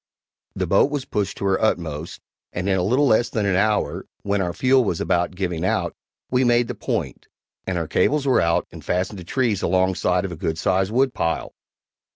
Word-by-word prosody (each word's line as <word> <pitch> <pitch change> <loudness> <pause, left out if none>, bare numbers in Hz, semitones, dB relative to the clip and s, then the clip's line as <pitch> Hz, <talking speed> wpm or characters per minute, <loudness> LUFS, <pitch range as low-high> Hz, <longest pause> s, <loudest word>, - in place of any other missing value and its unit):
The - - -1
boat - - +3
was 145 -3 -3
pushed 100 -1 -2
to - - -4
her 95 -1 +1
utmost, 85 -7 -2 0.3
and 90 +2 -3
in 95 - +2
a 95 - +1
little 125 +10 +2
less 120 -2 +3
than 110 -3 -1
an 95 -2 +2
hour, 105 +2 0 0.2
when 100 0 0
our 90 -2 -1
fuel 130 +6 +3
was 90 -7 -1
about 90 0 0
giving 90 -3 -2
out, - - 0 0.4
we 125 +1 +3
made 120 -1 +3
the - - -3
point, - - -4 0.4
and 95 - -1
our 85 -2 -2
cables 145 - +1
were 130 - +3
out 85 0 +1
and - - -11
fastened 95 +2 -2
to - - -8
trees 115 +1 0
alongside 95 0 +1
of 95 - -4
a - - -5
good 80 0 -2
sized 95 +3 +1
wood 130 +2 +2
pile. 80 - -2
95 Hz, 205 wpm, -22 LUFS, 90-120 Hz, 0.4 s, boat